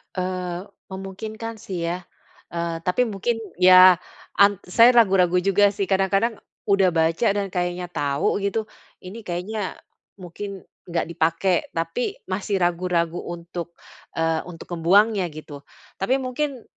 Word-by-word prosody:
Eee, 180 -1 -3 0.3
memungkinkan 215 +4 -7
sih 185 -4 -5
ya, 180 0 -5 0.5
eee, 170 -1 -2
tapi 180 +7 +2
mungkin 225 0 -1 0.2
ya 185 -1 +8 0.4
an 200 -1 +4
saya 230 +7 +5
ragu-ragu 185 -6 +4
juga 200 +1 +3
sih, 195 -1 -3
kadang-kadang, 195 +4 +1 0.3
udah 195 -1 +4
baca 165 +6 +2
dan 200 -1 -2
kayaknya 175 0 -3
tau 145 -1 0
gitu, 200 +2 -1 0.4
ini 190 +5 -9
kayaknya 185 +3 -3 0.5
mungkin 195 +2 -7 0.2
nggak 170 -1 -2
dipakai, 165 +3 +1 0.2
tapi 165 +8 -2 0.2
masih 195 0 -1
ragu-ragu 175 -1 0
untuk, 170 0 -7 0.4
eee, 165 0 +1
untuk 175 -1 -11
ngebuangnya 190 +4 +3
gitu. 145 -2 -10 0.3
Tapi 195 +7 +1
mungkin, 260 0 -3
185 Hz, 125 wpm, -23 LUFS, 175-200 Hz, 0.5 s, ya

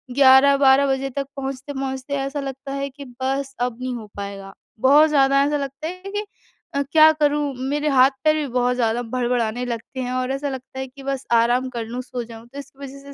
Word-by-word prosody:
11-12 275 0 +6
बजे 270 0 -1
तक 275 +2 -3
पहुँचते-पहुँचते 270 0 -5
ऐसा 275 +1 -3
लगता 270 0 -6
है 275 0 -3
कि 280 +1 -11 0.2
बस 270 +1 -1
अब 245 -2 -1
नहीं 255 0 -3
हो 225 -2 -7
पाएगा 200 -1 -7 0.3
बहुत 295 +4 +6
ज़्यादा 275 -1 +4
ऐसा 295 +1 +1
लगता 280 +2 -5
है 365 +2 -7
कि 420 - -2 0.5
अ, 280 - +2
क्या 315 0 +7
करूँ 295 -2 +1 0.2
मेरे 295 +1 0
हाथ-पैर 270 +3 +4
भी 300 - -1
बहुत 250 0 +1
ज़्यादा 235 -1 0
भड़भड़ाने 245 -1 0
लगते 240 +2 -6
हैं 250 0 -3
और 255 +1 -1
ऐसा 280 +1 -2
लगता 265 0 -7
है 265 - -4
कि 270 +1 -14
बस 275 -1 -3
आराम 240 +3 +3
कर 230 -1 -3
लूँ, 240 +3 -5
सो 250 -1 -5
जाऊँ। 230 0 -12
तो 275 +4 -10
इसकी 275 -1 -12
वज़ह 275 +1 -10
270 Hz, 200 wpm, -22 LUFS, 250-280 Hz, 0.5 s, क्या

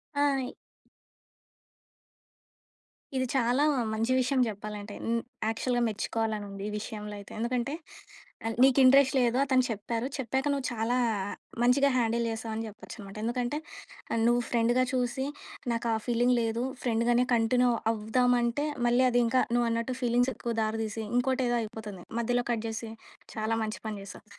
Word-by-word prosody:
ఆ! - - -1 0.3
ఇ - - -9 2.6
ఇది 260 0 +1
చాలా 250 +2 +2 0.3
మంచి 225 +3 0
విషయం 255 +1 +1
జెప్పాలంటే. 210 0 -6
హ్మ్. 230 0 0 0.3
యాక్చుల్‌గా 240 +2 0
మెచ్చుకోవాలనుంది, 210 -2 -3
ఈ - - -5
విషయంలో 210 -1 -6
అయితే. 200 - -12
ఎందుకంటే, 245 +3 -1 0.7
ఆహ్, 225 - -2
నీకింట్రెస్ట్ 270 +1 +6
లేదు 245 0 +2
అతను 260 -2 +3
చెప్పారు, 230 +3 -2
చెప్పాక 265 +1 -1
నువ్వు 275 -2 -2
చాలా, 230 +2 0 0.7
మంచిగా 275 +3 +5
హ్యాండిల్ 235 0 +1
జేసావని 225 0 -4
చెప్పొచ్చనమాట. 205 -1 -10
ఎందుకంటే 245 +4 -1 0.6
ఆహ్, 225 - +1
నువ్వు 240 0 +3
ఫ్రెండుగా 240 +2 +3
చూసి, 255 +1 0 0.5
నాకా 230 0 -1 0.2
ఫీలింగ్ 245 +1 +3
లేదు, 230 +1 -1 0.2
ఫ్రెండు 230 -1 +1
గానే 240 +1 +4
కంటిన్యూ 245 +2 +3 0.2
అవ్వుదామంటే, 240 +4 +1 0.2
మళ్ళీ 245 +2 +4
అదింకా 245 +1 +3
నువ్వన్నట్టు 235 +1 0
ఫీలింగ్సెక్కువ 245 0 +1
దారి 220 +1 -1
తీసి, 220 +1 -4
ఇంకోటేదో 250 -1 +2
అయిపోతుంది. 210 -4 -7 0.2
మధ్యలో 245 +1 +1
కట్ 230 -2 -1
జేసి, 220 0 -5 0.4
చాలా 220 +1 0
మంచి 215 0 -4
పని 215 - -4
చేశావు. 195 - -11
235 Hz, 130 wpm, -29 LUFS, 220-250 Hz, 2.6 s, నీకింట్రెస్ట్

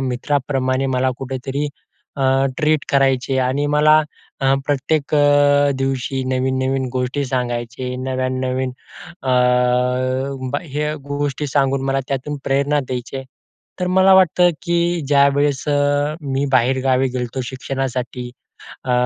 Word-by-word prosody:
मित्राप्रमाणे 130 0 -1
मला 130 0 +2
कुठेतरी 135 +2 -3 0.5
अ, 140 - -2 0.4
ट्रीट 155 -2 +1
करायचे 135 -1 +2
आणि 140 +3 0
मला 150 +1 +5 0.4
अ, 135 0 +3
प्रत्येक 145 +1 0
अ, 145 -1 +4
दिवशी 135 0 -1
नवीन-नवीन 130 0 0
गोष्टी 130 +2 -1
सांगायचे 125 0 -3
नव्यान 130 0 -2
नवीन 130 0 -1 0.5
अ, 130 - -4 1.2
ब - - +1
हे 150 0 -3
गोष्टी 145 0 -2
सांगून, 135 -1 +1
मला 135 0 0
त्यातून 140 +2 -3
प्रेरणा 140 +2 +1
द्यायचे. 130 +1 -5 0.6
तर 180 - 0
मला 190 +1 +5
वाटतं, 180 -1 +5
की 170 0 0
ज्यावेळेस 140 0 +3
अ, 145 +1 +1
मी 135 -1 -1
बाहेरगावी 130 +1 +2
गेलो 125 -1 -2
होतो 125 +2 -5
शिक्षणासाठी 130 -1 -4 0.6
अ, 125 - -1
135 Hz, 120 wpm, -19 LUFS, 130-145 Hz, 1.2 s, मला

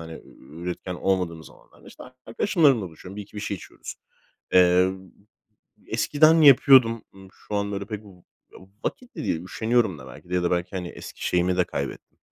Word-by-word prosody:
hani, 80 0 -9 0.2
üretken 85 +6 -6
olmadığımız 90 -3 -2
zamanlarda - - -20
işte - - -13 0.2
arkadaşlarımla 135 - +2
buluşuyorum, 90 +4 -12
1-2 105 0 -9
bir 105 - -5
şey 100 - -3
içiyoruz. - - -10 0.6
Eee, 90 +1 +5 0.9
eskiden 150 +8 +3
yapıyordum, 130 -5 +6
ııı, 95 -1 -14
şu 105 - -9
an 100 0 -1
böyle 100 0 -4
pek 105 -1 -7
v - - -14
ı 100 - -14 0.7
vakit 250 -6 -5
de 155 - -5
değil 80 - -1
üşeniyorum 110 -3 0
da 65 - -12
belki 85 - -13
de - - -2
ya 90 - +1
da 85 - 0
belki, 90 0 -1
hani, 90 -1 -4
eski - - -8
şeyimi 90 0 +1
de 90 - +3
kaybettim. - - -6
95 Hz, 175 wpm, -24 LUFS, 90-115 Hz, 0.9 s, yapıyordum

